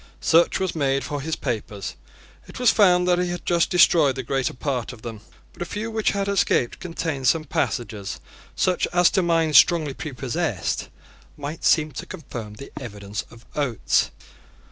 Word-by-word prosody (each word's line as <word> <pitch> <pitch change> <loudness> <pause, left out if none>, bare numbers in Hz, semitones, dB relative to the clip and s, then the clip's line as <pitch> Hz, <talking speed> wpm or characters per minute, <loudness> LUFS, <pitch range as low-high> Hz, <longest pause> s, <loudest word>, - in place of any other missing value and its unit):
Search 170 +1 +3
was 190 -2 -1
made 140 -3 0
for 145 -1 -4
his 160 +3 -2
papers. 105 -3 -4 0.5
It - - -10
was 250 -2 +5
found 180 -4 +4
that 180 0 +3
he 180 - +1
had 175 0 -5
just 170 -1 +2
destroyed 165 -6 +5
the 130 - -4
greater 130 +1 -1
part 125 -3 -2
of 110 - -14
them. 115 -3 -7 0.3
But - - -15
a - - -1
few 215 +5 -4
which 220 -1 +1
had 200 0 -1
escaped 195 -11 +1
contained 160 -6 -3
some 160 +4 +3
passages 120 -9 -3 0.4
such 185 -1 +1
as, 175 0 +5
to 190 - +2
minds 165 -3 +5
strongly 160 -5 +3
prepossessed, 135 - -3 0.5
might 145 +3 -6
seem 155 -1 +3
to - - -7
confirm 120 - -8
the 140 - -10
evidence 105 -4 -6
of 115 0 -16
Oates. 135 -7 +1
150 Hz, 170 wpm, -23 LUFS, 125-175 Hz, 0.5 s, was